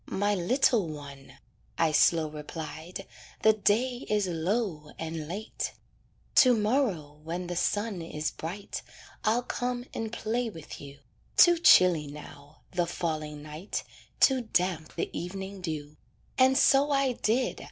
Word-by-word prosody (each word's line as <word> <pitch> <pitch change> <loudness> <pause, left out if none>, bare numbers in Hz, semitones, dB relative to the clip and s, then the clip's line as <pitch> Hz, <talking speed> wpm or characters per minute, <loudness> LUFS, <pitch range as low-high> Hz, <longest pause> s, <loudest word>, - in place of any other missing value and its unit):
"My 205 +1 0
little 220 +2 +2
one," 145 -3 -9 0.4
I 165 -1 +3
slow 160 +1 +4
replied, 155 +2 -7 0.4
"The 220 - +7
day 230 +4 +1
is 210 -1 +2
low 175 -2 -2
and 160 -1 -5
late. 205 +7 -4 0.6
"To 255 -4 +7
morrow 210 - 0
when 170 +3 -4
the 175 0 -4
sun 205 +1 -1
is 155 -2 -3
bright, 185 +5 -6 0.4
I'll 230 +3 +2
come 245 0 -3
and 225 -1 -4
play 230 +1 -1
with 165 -7 -10
you; 140 0 -11 0.4
Too 345 -1 +7
chilly 180 - +6
now, 145 0 -12
the 175 -1 0
falling 155 -4 -3
night, 155 +6 -5 0.4
Too 265 -2 +5
damp 180 -7 -1
the 170 - -2
evening 190 +2 -5
dew." 155 -3 -5 0.4
And 260 0 +5
so 280 +1 +5
I 275 -2 +2
did. 245 +1 0
180 Hz, 135 wpm, -28 LUFS, 155-225 Hz, 0.6 s, The